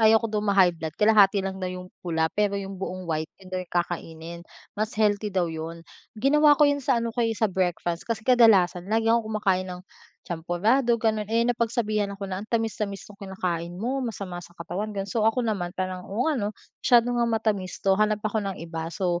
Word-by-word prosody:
ayaw 220 +1 +5
ko - - +2
daw 210 - +1
ma-high 195 -3 +4
blood 160 -1 -6
kalahati 205 -2 +5
lang 190 0 -4
daw 185 - -2
'yung' 180 0 -8
pula 160 -2 0
pero 205 -1 +1
'yung 195 -1 -6
buong 185 -1 -4
white 160 -1 -2
'yun 190 -1 -15
daw 185 - -1
kakainin, 170 -1 -3 0.3
mas 215 +1 -3
healthy 210 -1 +2
daw 185 -3 +1
'yun. 165 +1 -6 0.3
Ginawa 290 +5 +5
ko 300 - +6
'yun 285 0 +2
sa 265 -1 +2
ano 230 -1 -1
ko, 245 - -2
eh, 225 -2 +1
sa - - +1
breakfast 175 -3 -1
kasi 220 -1 -2
kadalasan 200 -8 +4
lagi 225 +1 +2
akong 230 -2 +1
kumakain 185 -3 +1
ng 180 0 -6 0.4
champorado, 205 +9 +1
gano'n, 220 -2 0
eh, 230 +1 +2
napagsabihan 230 -3 0
ako 200 - -6
na, 185 - -2
"Ang 215 - -10
tamis-tamis 215 -3 -2
nung 200 - -14
kinakain 175 -3 -3
mo 250 +8 -2
masama 200 -7 -5
sa 175 +1 -15
katawan." 200 +5 -5
Gano'n. 195 0 -3
So 220 -1 +3
ako 240 +2 0
naman 195 -5 -2
parang, 185 -1 -4
"Oo 215 +5 -1
nga 305 -6 +1
'no, 205 - 0 0.3
masyado 240 -1 +5
ngang 235 -1 +1
matamis 200 -5 -1
'to, 195 - +5
hanap 215 0 +1
ako 215 +1 0
ng 195 - -5
iba." 165 -1 -5
So 175 0 -1
200 Hz, 210 wpm, -26 LUFS, 180-225 Hz, 0.4 s, ko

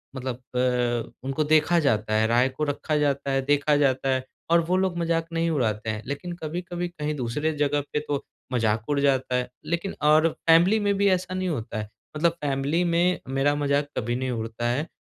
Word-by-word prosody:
मतलब 130 -2 -3
अ, 125 -2 -1
उनको 135 +3 -1
देखा 155 +3 +3
जाता 110 -7 +1
है। 110 +1 +3
राय 120 +3 +3
को 130 +4 -4
रखा 150 +1 -1
जाता 140 -2 0
है, 135 0 +1
देखा 145 +1 +3
जाता 135 -2 +1
है 130 -1 0 0.3
और 170 - +6
वो 180 +2 +1
लोग 185 -2 0
मज़ाक 165 -1 0
नहीं 165 0 +1
उड़ाते 110 -7 -1
हैं। 110 -1 -3
लेकिन 145 +6 -5
कभी-कभी 175 +2 -3
कहीं 150 -3 -4
दूसरे 145 +4 -1
जग़ह 145 0 +1
पे 150 - +1
तो 145 -1 -2 0.3
मज़ाक 110 -1 0
उड़ 145 -1 +1
जाता 130 -2 +1
है। 125 0 -1 0.2
लेकिन 170 +4 -2
और 155 +2 +5 0.2
फैमिली 175 +7 +6
में 205 -1 +1
भी 200 - +3
ऐसा 185 -1 0
नहीं 185 -1 -1
होता 115 -6 -4
है। 105 - -5 0.3
मतलब 170 +2 +3
फैमिली 145 +4 0
में 175 +1 +2
मेरा 135 +2 +1
मज़ाक 145 0 +1
कभी 120 +1 -1
नहीं 130 0 -2
उड़ता 115 0 -3
है 140 +7 -1
145 Hz, 200 wpm, -25 LUFS, 125-165 Hz, 0.3 s, और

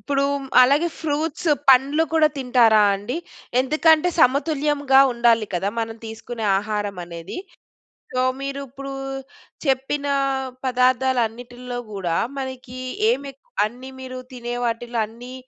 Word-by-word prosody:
ఇప్పుడు 275 -1 0 0.4
అలాగే 285 +7 +4
ఫ్రూట్స్, 315 +2 -2 0.2
పండ్లు 275 +4 +5
కూడా 310 -1 +5
తింటారా 240 -4 +4
అండి? 205 +9 -4 0.4
ఎందుకంటే 310 +4 +4
సమతుల్యంగా 285 -1 +3
ఉండాలి 235 -2 +3
కదా 190 +3 0
మనం 225 0 -4
తీసుకునే 225 +1 -6
ఆహారం 205 -2 -3
అనేది. 170 - -8 0.7
సో 255 0 +1 0.2
మీరు 275 0 -4
ఇప్పుడు 275 +1 -8 0.7
చెప్పిన 270 +2 0 0.6
పదార్థాలు 255 0 +2
అన్నిటిలో 245 +2 -8
కూడా 180 -4 -2 0.2
మనకి 260 -1 -6 0.3
ఏమి 275 +3 -1
ఎక్ 270 - -33 0.3
అన్ని 250 +5 -6
మీరు 255 -1 -7
తినే 240 -1 -5
వాటిల్లో 235 0 -2
అన్ని 240 +3 -11
255 Hz, 115 wpm, -22 LUFS, 230-275 Hz, 0.7 s, పండ్లు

